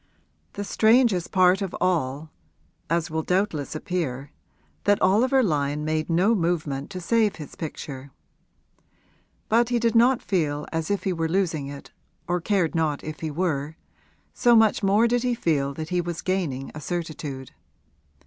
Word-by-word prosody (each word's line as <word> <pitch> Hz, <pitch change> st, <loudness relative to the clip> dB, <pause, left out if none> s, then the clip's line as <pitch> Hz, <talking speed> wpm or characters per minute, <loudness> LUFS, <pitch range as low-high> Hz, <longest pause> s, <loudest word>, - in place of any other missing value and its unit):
The 205 Hz, -, -4 dB
strangest 220 Hz, -3 st, +3 dB
part 185 Hz, +1 st, +4 dB
of 195 Hz, -2 st, -3 dB
all 155 Hz, -3 st, -1 dB, 0.6 s
was 165 Hz, 0 st, +1 dB
as 165 Hz, -, -10 dB
will 160 Hz, 0 st, -1 dB
doubtless 180 Hz, -5 st, -1 dB
appear 155 Hz, -6 st, -3 dB, 0.5 s
that 205 Hz, -1 st, +4 dB
Oliver 250 Hz, +8 st, +3 dB
Lyon 150 Hz, -4 st, 0 dB
made 155 Hz, +1 st, -1 dB
no 180 Hz, +7 st, +3 dB
movement 160 Hz, -7 st, -1 dB
to 185 Hz, -2 st, -6 dB
save 215 Hz, +3 st, +1 dB
his 155 Hz, -3 st, -9 dB
picture. 140 Hz, -4 st, -7 dB, 1.4 s
But 235 Hz, +2 st, +3 dB
he 245 Hz, -, +1 dB
did 230 Hz, -1 st, +1 dB
not 240 Hz, +2 st, +4 dB
feel 150 Hz, -6 st, -1 dB
as 160 Hz, -1 st, -2 dB
if 200 Hz, -1 st, -1 dB
he 190 Hz, -, 0 dB
were 165 Hz, -1 st, -2 dB
losing 165 Hz, -6 st, 0 dB
it 140 Hz, 0 st, -10 dB, 0.4 s
or 175 Hz, 0 st, 0 dB
cared 185 Hz, -3 st, +1 dB
not 155 Hz, -3 st, 0 dB
if 155 Hz, 0 st, -6 dB
he 160 Hz, -, -3 dB
were, 155 Hz, -2 st, -2 dB, 0.6 s
so 240 Hz, -1 st, +4 dB
much 220 Hz, -2 st, +4 dB
more 205 Hz, +4 st, +4 dB
did 240 Hz, +1 st, +1 dB
he 250 Hz, -1 st, 0 dB
feel 145 Hz, -9 st, 0 dB
that 155 Hz, +1 st, -6 dB
he 180 Hz, -1 st, +1 dB
was 175 Hz, -1 st, -5 dB
gaining 165 Hz, -9 st, -2 dB
a 150 Hz, -, -8 dB
certitude. 155 Hz, -6 st, -5 dB
170 Hz, 160 wpm, -25 LUFS, 150-200 Hz, 1.4 s, part